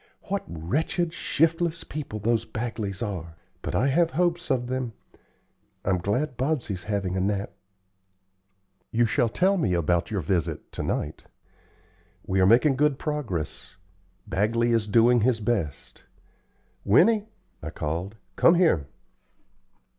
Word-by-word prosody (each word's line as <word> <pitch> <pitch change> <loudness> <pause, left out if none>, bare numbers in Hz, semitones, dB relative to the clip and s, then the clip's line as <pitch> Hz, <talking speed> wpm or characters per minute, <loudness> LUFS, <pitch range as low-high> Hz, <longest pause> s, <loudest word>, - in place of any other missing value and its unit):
What 200 0 -2
wretched, 160 - -1
shiftless 165 0 0
people 150 -8 -6
those 115 +2 +1
Bagleys 110 -3 -4
are! 85 -6 -5 0.3
But - - -4
I - - +2
have 165 +4 +3
hopes 175 0 0
of 130 -3 +1
them. 125 -2 -3 0.9
I'm 95 -1 +2
glad 125 - -1
Bobsey's 125 - -2
having 100 -3 -1
a 95 - 0
nap." 100 +1 -1 1.4
"You 120 +1 +3
shall 120 +1 +1
tell 190 - +2
me 95 - +1
about 85 +1 +1
your 100 -4 -1
visit 80 -2 -2
to - - -5
night. 75 +1 -3 1.0
We 95 0 0
are 95 - +5
making 130 +6 +5
good 150 -1 +2
progress. 120 - -4 0.5
Bagley 115 +4 +1
is 115 -2 +1
doing 115 +2 +5
his 115 0 +2
best. 105 -10 -3 0.8
Winnie," 210 - +4 0.3
I - - -5
called, 85 +7 -4 0.2
"come 170 - +5
here." 160 - +3
115 Hz, 130 wpm, -26 LUFS, 95-150 Hz, 1.4 s, are